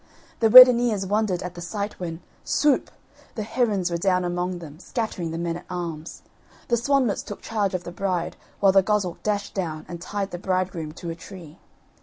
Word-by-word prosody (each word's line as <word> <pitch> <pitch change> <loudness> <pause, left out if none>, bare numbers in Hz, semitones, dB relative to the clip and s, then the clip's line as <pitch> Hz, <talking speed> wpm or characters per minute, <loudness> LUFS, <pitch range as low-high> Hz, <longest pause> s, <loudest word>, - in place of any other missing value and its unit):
The 225 - +3
weddineers 240 -4 +8
wondered 205 -2 0
at 180 -1 -6
the 175 - -9
sight 205 +4 -5
when, 165 -2 -5 0.2
swoop! 295 -2 +2 0.5
the 215 - -3
herons 205 -6 0
were 170 - -1
down 180 0 +1
among 175 +1 -2
them 155 -3 -11
scattering 205 -6 -4
the 165 - -4
men 170 0 -2
at - - -13
arms. 170 -3 -6 0.5
The 240 - +4
swanlets 245 -2 +1
took 205 - -9
charge 205 -4 -1
of 180 - -3
the 175 - -7
bride 180 -2 -2 0.3
while 195 -1 +6
the 195 0 +5
goshawk 200 -3 -1
dashed 205 -1 -2
down 160 -5 -4
and 170 -1 -8
tied 200 +2 -4
the 175 - -6
bridegroom 185 -4 -2
to 170 0 -6
a - - -6
tree. 170 -2 -12
185 Hz, 190 wpm, -24 LUFS, 175-210 Hz, 0.5 s, weddineers